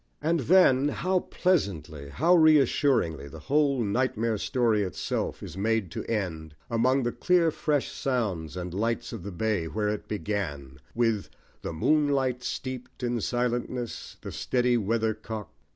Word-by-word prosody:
And 165 +2 +1
then, 140 -3 +5
how 185 +5 0
pleasantly, 85 - -1
how 165 - +3
reassuringly, 140 - +4
the 80 - -10 0.2
whole 140 -4 +3
nightmare 115 0 0
story 115 -3 +1
itself 95 -2 -3
is 80 - -8
made 105 -2 0
to - - -4
end, 80 -8 -3 0.2
among 130 +3 +2
the 120 - 0
clear 175 +1 +2
fresh 145 -2 -1
sounds 100 - -2
and 90 -1 -5
lights 115 +5 -1
of 115 - -6
the 100 +3 -6
bay, 100 -2 -1
where 105 +4 -1
it 105 0 -4
began, 75 -11 -4 0.2
with 115 -3 +1 0.3
The - - -4
moon 150 - +2
light 130 -3 0
steeped 130 0 -6
in 120 -1 0
silentness, 120 +1 -2
The - - -7
steady 125 -1 +1
weather 110 0 +1
cock. 110 -1 -7
115 Hz, 150 wpm, -27 LUFS, 100-130 Hz, 0.3 s, then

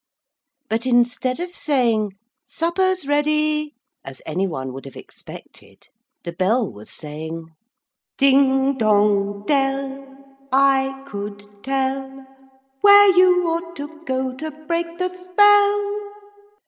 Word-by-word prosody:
But 230 +2 -2
instead 250 +2 +1
of 355 0 -5
saying 230 -8 0 0.3
'Supper's 370 +1 -1
ready,' 300 +1 0 0.3
as 135 -1 -8
any 185 +5 -1
one 130 -6 -5
would 135 +1 -9
have 135 - -11
expected, - - -14 0.3
the 170 - -6
bell 205 - 0
was 105 0 -12
saying 160 +2 -7 0.7
Ding 270 0 +3
dong 205 -2 +1
dell! 275 0 -1 0.5
I 270 0 +2
could 205 -2 -7 0.2
tell 270 0 -3 0.6
Where 405 -1 +7
you 360 -1 +5
ought 335 +1 -3
to 310 +2 -9
go 260 -2 -2
To 315 +3 -5 0.2
break 335 +2 -1
the 365 0 -1
spell. 410 +2 +2
270 Hz, 110 wpm, -21 LUFS, 210-335 Hz, 0.7 s, Where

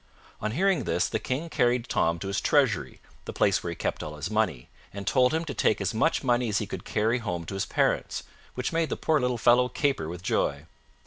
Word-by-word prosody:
On 110 - -2
hearing 190 +6 +2
this, - - +1
the - - -2
King 140 +6 -3
carried 120 -5 +1
Tom 85 +1 +1
to 95 - -6
his 100 - -1
treasury, - - +1 0.3
the - - -6
place - - +2
where - - -4
he - - -4
kept - - -3
all 75 - -6
his 75 +7 -5
money, 110 - 0 0.2
and 100 0 -7
told 125 +3 +3
him 160 +1 -1
to 145 - -4
take 110 - +2
as 100 +1 -1
much 145 +10 +1
money 120 -2 +2
as 105 - +1
he 105 - -1
could 100 - -7
carry 110 +3 +1
home 90 -7 -4
to 95 - -6
his 95 -2 -2
parents, - - 0 0.3
which 125 +5 -2
made 165 -1 +1
the - - -2
poor 155 -1 +2
little 125 -1 0
fellow 120 +2 +4
caper 135 - 0
with 90 +1 -7
joy. 70 -5 0
115 Hz, 235 wpm, -27 LUFS, 95-130 Hz, 0.3 s, fellow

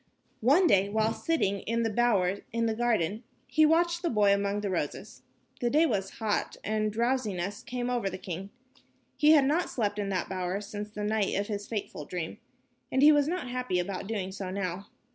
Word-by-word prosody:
One 290 +11 +4
day, 200 - +4
while 220 +1 +1
sitting 200 - 0
in 230 +4 -1
the 225 - +1
bower 200 -5 +2
in 230 0 0
the 225 - +1
garden, 220 -4 0 0.2
he 310 0 +4
watched 340 +2 +2
the 345 - 0
boy 205 -3 +4
among 200 +1 0
the 200 -2 -2
roses. - - -4 0.4
The 240 - +1
day 305 +6 +4
was 195 -9 -2
hot 215 -2 -1
and 215 0 0
a - - 0
drowsiness 210 -4 -1
came 245 +1 -4
over 245 -5 0
the 185 - -6
king. 185 +1 -6 0.7
He 305 0 +6
had 290 -3 +6
not 315 +6 +1
slept 210 -3 -1
in 200 -1 -2
that 190 -2 -1
bower 185 0 -2
since 210 0 -6
the 210 0 -6
night 210 -1 0
of 205 +2 -1
his 205 -1 -4
fateful 215 -3 -4
dream, 180 +3 -5 0.5
and 265 +1 +2
he 300 - +9
was 290 -1 +3
not 345 -6 -2
happy 250 -7 -1
about 185 +2 -3
doing 200 -4 -3
so 190 -1 -5
now. 190 0 -4
210 Hz, 200 wpm, -29 LUFS, 195-245 Hz, 0.7 s, he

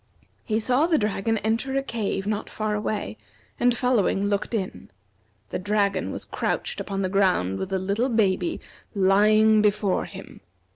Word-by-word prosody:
He 220 0 0
saw 255 +7 +3
the 330 -3 +3
dragon 215 +1 0
enter 230 +6 -1
a 275 - 0
cave 220 -6 -3
not 210 0 -2
far 215 -1 -2
away, 210 - -3 0.4
and 245 -1 +3
following 225 -5 +1
looked 205 +3 -1
in. 190 -4 -4 0.6
The - - -2
dragon 205 +1 0
was - - -5
crouched - - -2
upon 195 -1 -3
the - - +1
ground 185 - +1
with 190 - -4
the 190 - 0
little 200 +7 -1
baby 220 - +1 0.4
lying 210 +3 +4
before 205 -2 +1
him. - - -11
210 Hz, 155 wpm, -24 LUFS, 195-225 Hz, 0.6 s, lying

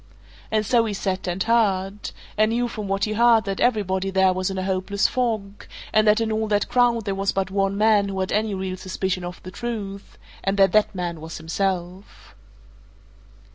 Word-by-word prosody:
And 215 -1 +1
so 230 +1 +3
he 210 -2 -3
sat 190 -1 -2
and 180 +2 -1
heard 205 -3 +1 0.3
and 215 +1 +3
knew 240 +2 0
from 215 -3 -6
what 195 0 -1
he 215 - -2
heard 230 0 +4
that 195 -1 -3
everybody 195 -5 +1
there 190 -1 +3
was 185 +1 -1
in 190 - -4
a 185 - -2
hopeless 190 +1 0
fog, 215 -5 -2 0.3
and 215 0 +4
that 210 +1 +5
in 225 -1 -1
all 220 0 0
that 205 -1 +1
crowd 240 -3 +2
there 200 - -1
was 195 0 0
but 190 -1 -2
one 195 0 0
man 210 -2 +3
who 190 -1 -4
had 190 - -2
any 210 -1 0
real 190 -1 -4
suspicion 185 0 -3
of 175 0 -6
the 185 - -8
truth, 200 -3 -6 0.3
and 195 +1 0
that 195 -2 +5
that 215 0 +2
man 175 -3 -4
was 160 +1 -7
himself. 175 - -4
195 Hz, 200 wpm, -23 LUFS, 190-215 Hz, 0.3 s, that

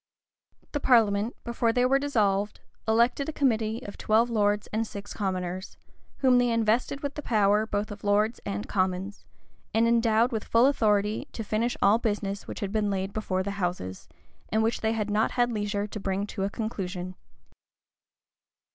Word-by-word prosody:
The 290 - -1
parliament, 225 -4 +3
before 235 -1 0
they 245 +2 +2
were 270 +2 +3
dissolved, 210 -7 0 0.3
elected 235 +6 +2
a - - -1
committee 230 -5 0
of 200 - -9
twelve 230 +3 +2
lords 205 -2 +1
and 225 +1 0
six 205 -1 -8
commoners,[] 185 -2 -3 0.4
whom 255 -2 +5
they 245 0 +2
invested 230 +4 +1
with 285 -1 -3
the 295 - -5
whole - - -14
power 205 +1 +4
both 210 0 -2
of 205 0 -9
lords 210 +3 +2
and 100 +1 -4
commons, 190 +1 -2 0.5
and 225 +1 +4
endowed 230 +1 +3
with 220 -3 -2
full 230 +2 +4
authority 210 -6 +2
to 225 - -4
finish 220 +3 -1
all 210 +3 +5
business 205 -3 -2
which - - -7
had 200 -1 -2
been 215 -1 0
laid 195 0 -2
before 190 -3 -1
the 200 - -3
houses, 135 - -3 0.4
and 220 +1 +2
which 225 +1 0
they 220 0 +1
had 210 -2 -2
not 215 +2 +1
had 245 -1 +2
leisure 205 -2 -1
to 210 +1 -7
bring 195 0 -1
to 200 -2 -3
a - - -1
conclusion. 185 -5 -4
215 Hz, 175 wpm, -27 LUFS, 200-230 Hz, 0.5 s, whom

